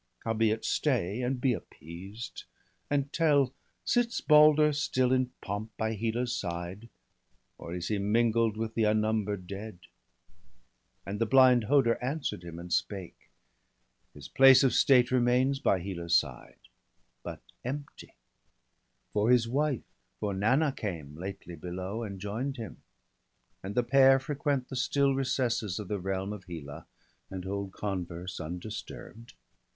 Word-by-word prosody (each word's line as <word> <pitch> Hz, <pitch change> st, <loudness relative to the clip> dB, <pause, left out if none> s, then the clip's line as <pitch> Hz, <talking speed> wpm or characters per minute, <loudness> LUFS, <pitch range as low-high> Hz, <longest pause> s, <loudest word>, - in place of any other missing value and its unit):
Howbeit 110 Hz, -1 st, +1 dB
stay, 120 Hz, -, 0 dB
and 125 Hz, +1 st, -1 dB
be 125 Hz, 0 st, +2 dB
appeased! 95 Hz, +4 st, -9 dB, 0.4 s
and 140 Hz, -1 st, -1 dB
tell: 145 Hz, -5 st, +3 dB, 0.3 s
Sits 240 Hz, -1 st, +1 dB
Balder 150 Hz, 0 st, +6 dB
still 130 Hz, -3 st, +1 dB
in 130 Hz, -1 st, +2 dB
pomp 105 Hz, +3 st, -5 dB
by 110 Hz, 0 st, -1 dB
Hela's 115 Hz, +3 st, -1 dB
side. 90 Hz, +5 st, -5 dB, 0.7 s
Or 85 Hz, -, -6 dB
is 85 Hz, -1 st, -4 dB
he 105 Hz, -2 st, 0 dB
mingled 115 Hz, +1 st, +2 dB
with 110 Hz, 0 st, -3 dB
the 110 Hz, -1 st, +1 dB
unnumber'd 105 Hz, -2 st, 0 dB
dead?' 100 Hz, 0 st, -8 dB, 1.2 s
And 105 Hz, +3 st, -5 dB
the 115 Hz, -, +2 dB
blind 130 Hz, -2 st, +6 dB
Hoder 125 Hz, -2 st, +3 dB
answer'd 135 Hz, -, -3 dB
him 85 Hz, -1 st, -8 dB
and 85 Hz, 0 st, -5 dB
spake: 95 Hz, -4 st, -3 dB, 0.2 s
— -, -, -45 dB
' -, -, -45 dB
His 75 Hz, -, -10 dB
place 135 Hz, -1 st, +7 dB
of 135 Hz, -, +3 dB
state 125 Hz, -3 st, +5 dB
remains 130 Hz, +2 st, +2 dB
by 115 Hz, -9 st, +2 dB
Hela's 85 Hz, -2 st, -1 dB
side, -, -, -1 dB, 0.6 s
But -, -, -8 dB, 0.2 s
empty; 145 Hz, +3 st, -7 dB, 1.0 s
for 105 Hz, +2 st, +2 dB
his 125 Hz, -2 st, +4 dB
wife, 140 Hz, +1 st, 0 dB, 0.4 s
for 105 Hz, -2 st, -2 dB
Nanna 130 Hz, +10 st, +2 dB
came 80 Hz, -, -6 dB
Lately 90 Hz, 0 st, -7 dB
below, 90 Hz, +6 st, -5 dB
and 100 Hz, -4 st, -6 dB
join'd 115 Hz, +8 st, -3 dB
him; 110 Hz, -7 st, -8 dB, 0.8 s
and 100 Hz, +2 st, -6 dB
the 125 Hz, -, +3 dB
pair 135 Hz, +2 st, +6 dB
Frequent 140 Hz, -1 st, -2 dB
the -, -, -6 dB
still 140 Hz, +1 st, +2 dB
recesses 125 Hz, -7 st, -1 dB
of 105 Hz, -3 st, -6 dB
the 105 Hz, -, -1 dB
realm 95 Hz, +2 st, -3 dB
Of 100 Hz, -3 st, -10 dB
Hela, 75 Hz, -5 st, -8 dB, 0.4 s
and 95 Hz, -1 st, -6 dB
hold 100 Hz, 0 st, -4 dB
converse 90 Hz, -2 st, -5 dB
undisturb'd. 105 Hz, +6 st, -8 dB
110 Hz, 140 wpm, -29 LUFS, 95-130 Hz, 1.2 s, place